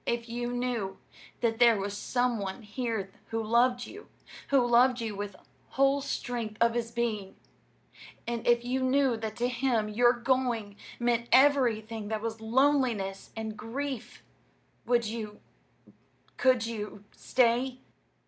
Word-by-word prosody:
If 235 0 -1
you 240 +1 -3
knew 245 -6 -2 0.4
that 225 -1 0
there 235 -2 +6
was 200 +1 -3
some 245 +2 0
one 195 +4 -5
here 215 -3 -3 0.2
who 225 0 -2
loved 245 +2 +2
you 410 +3 -11 0.4
who 270 -3 +3
loved 245 +1 +4
you 225 -3 -3
with 205 0 -5
the - - -18 0.4
whole 275 +1 +4
strength 235 -5 -4
of 235 0 +4
his 235 -1 -2
being, 225 -5 -2 0.9
and 235 -1 -3
if 240 0 +3
you 255 +2 -1
knew 260 -1 +3
that 220 -1 -5
to 245 +1 0
him 240 -3 0
your 240 +3 +4
going 240 -4 0 0.2
meant 240 0 0
everything 230 -6 +3
that 220 0 -2
was 225 0 -4
loneliness 235 -5 +1
and 220 -1 -4
grief, 250 +3 -5 0.6
would 240 -1 +3
you 215 -1 -5 1.0
could 255 -3 +3
you 210 -3 -6
stay?" 250 +1 +1
235 Hz, 140 wpm, -29 LUFS, 220-250 Hz, 1.0 s, there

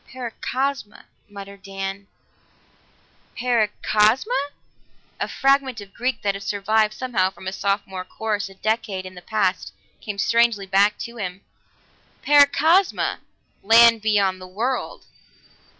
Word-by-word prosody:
"Paracosma," 260 0 -4 0.2
muttered 200 -1 -11
Dan. 195 0 -6 1.3
"Para 240 -3 +2 0.2
cosma!" 215 - +2 0.9
A - - -1
fragment 270 -3 +1
of 200 -1 -12
Greek 255 +2 -2
that 200 -1 +1
had 200 - -7
survived 210 +2 0
somehow 220 -8 0
from 190 - -14
a 185 - -3
Sophomore 195 -2 -2
course 205 +1 -3
a 195 - -15
decade 210 -3 -2
in 185 - -9
the 180 - -11
past 195 -2 -1 0.3
came 210 -2 -6
strangely 230 -1 +2
back 200 +2 +3
to 235 0 -8
him. 190 -2 -5 0.8
Paracosma! 295 +6 +3 0.4
Land 230 +1 +6
beyond 200 -3 +1
the 185 - -9
world! 230 +8 -3
210 Hz, 120 wpm, -22 LUFS, 195-235 Hz, 1.3 s, Land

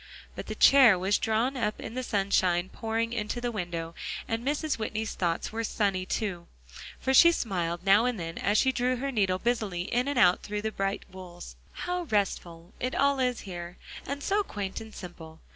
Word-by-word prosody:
But - - -7
the - - -4
chair 260 -8 +7
was 190 +3 +1
drawn 225 +5 +1
up 215 -4 -1
in - - -7
the 255 - -2
sunshine 190 -5 +1
pouring 225 +2 -2
into 220 +1 -2
the 240 0 -2
window, 170 -5 -4 0.3
and 225 +1 -2
Mrs. 295 0 -1
Whitney's 220 0 -3
thoughts 170 -2 -1
were 225 +1 -3
sunny, 195 -4 0
too; 185 -7 -3 0.5
for 265 - 0
she 340 +5 +8
smiled 175 - -2
now 200 +4 +5
and 250 -5 -1
then 165 -1 -5
as 205 +2 +2
she 265 - +4
drew 250 0 0
her 275 +3 -3
needle 195 -6 +1
busily 210 -5 -1
in 245 +7 0
and 285 -2 -1
out 180 -6 +5
through 210 0 -4
the 220 - -1
bright 195 0 -2
wools. 180 -2 -10 0.3
"How 360 0 -2
restful 180 - -2
it 255 +1 -2
all 280 -1 +2
is 250 -2 0
here, 175 -2 -7 0.3
and 280 +1 -4
so 405 +1 +2
quaint 205 - -5
and 220 -1 -11
simple." 165 -3 -10
215 Hz, 195 wpm, -28 LUFS, 185-245 Hz, 0.5 s, she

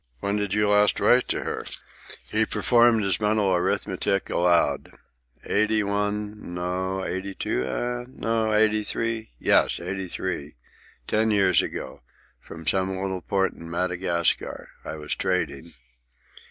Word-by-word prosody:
"When 100 +6 -1
did 105 -1 -1
you 105 0 +2
last 105 0 +4
write 125 0 +4
to - - -1
her?" - - -4 0.6
He - - +1
performed 120 -2 +3
his 95 +3 +1
mental 105 -2 +2
arithmetic 100 +2 0
aloud. 85 -1 +2 0.5
"Eighty 110 +1 +2
one; 105 -1 -2
no—eighty 95 +2 -3
two, 60 - -1
eh? 120 - -3
no—eighty 110 -3 +1
three? 115 +1 -2
Yes, - - +3
eighty 95 +2 -4
three. 85 -5 -4 0.5
Ten 110 - +1
years 95 -5 +4
ago. - - -6 0.4
From 80 0 -11
some 95 +3 +2
little 95 -1 -3
port 95 +1 0
in 85 - -10
Madagascar. 90 0 -1
I - - -6
was 75 -1 -4
trading. 85 -4 -2
95 Hz, 125 wpm, -25 LUFS, 90-105 Hz, 0.6 s, last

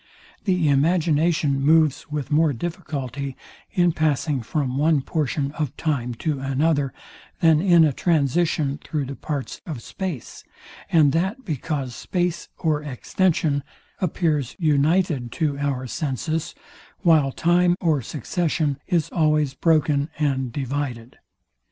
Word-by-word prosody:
The 180 -5 +2
imagination 155 0 +2
moves 155 0 +3
with 150 -1 -4
more 155 0 +3
difficulty 140 -3 -5 0.3
in 175 -3 +3
passing 150 -3 0
from 130 +2 -2
one 150 +1 +3
portion 140 -1 -1
of 150 -2 -4
time 125 -6 -1
to 150 -4 0
another, 140 +1 +1 0.5
than 160 -2 +5
in 175 -3 +6
a 150 -3 +3
transition 155 -1 +1
through 150 -3 -2
the 140 +1 -6
parts 145 -2 -5
of 140 -9 -5
space; 180 - -6 0.5
and 155 -4 +5
that 190 - -1
because 140 -4 -3
space 175 -2 -2
or 155 -2 0
extension 150 +1 0 0.4
appears 155 -7 0
united 155 -4 +2
to 145 -4 -1
our 140 -3 -1
senses, 155 +5 -3 0.5
while 160 -7 +4
time 175 +4 +3
or 155 -5 +1
succession 150 +2 -1
is 170 -5 +1
always 150 -4 +2
broken 150 -2 +2
and 135 -4 0
divided. 130 -3 -4
150 Hz, 120 wpm, -23 LUFS, 140-165 Hz, 0.5 s, in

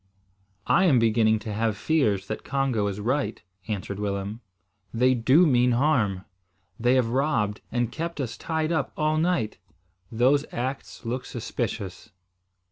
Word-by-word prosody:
"I 190 - +4
am 145 -8 +5
beginning 110 -1 +3
to 110 - -3
have 110 0 0
fears 105 -10 +1
that 110 - -5
Congo 135 -7 0
is 100 0 -4
right," 130 +7 -1 0.3
answered 100 -2 -4
Willem. 100 +2 -3 0.5
"They 125 +3 +3
do 130 +8 +4
mean 125 -4 +3
harm. 115 -9 +1 0.5
They 120 +2 +3
have 125 -3 +2
robbed 120 -5 0
and 120 -1 0
kept 170 +2 -4
us 125 -5 -3
tied 160 0 -2
up 160 -5 0
all 155 0 +1
night. 165 -9 0 0.5
Those 130 +5 +3
acts 130 +1 -5
look 125 +3 -2
suspicious." 110 -4 -5
120 Hz, 140 wpm, -26 LUFS, 110-140 Hz, 0.5 s, am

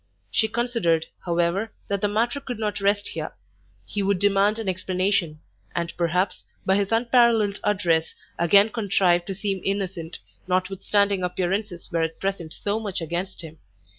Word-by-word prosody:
She 220 - +3
considered, 220 -9 +1 0.2
however, 175 +5 +1 0.2
that 200 -1 -1
the 205 - +3
matter 230 +6 0
could 250 -4 -5
not 210 -2 -2
rest 205 +1 +1
here: 155 -1 -5 0.5
he 205 - -3
would 200 0 +2
demand 205 +2 +3
an 225 -3 -4
explanation, 185 -3 0 0.3
and 170 0 -2
perhaps, 180 +2 0 0.2
by 190 - +4
his 200 0 0
unparalleled 230 -3 +3
address, 170 -6 +1 0.2
again 200 +5 +6
contrive 190 -6 +2
to 195 - -4
seem 195 -1 -2
innocent, 190 -4 -2 0.3
notwithstanding 195 +2 +1
appearances 180 +1 -2
were 165 -1 +1
at 160 0 -2
present 195 -5 -3
so 205 +5 -2
much 205 -4 -3
against 175 +3 -4
him. 160 -1 -10
195 Hz, 150 wpm, -24 LUFS, 175-205 Hz, 0.5 s, again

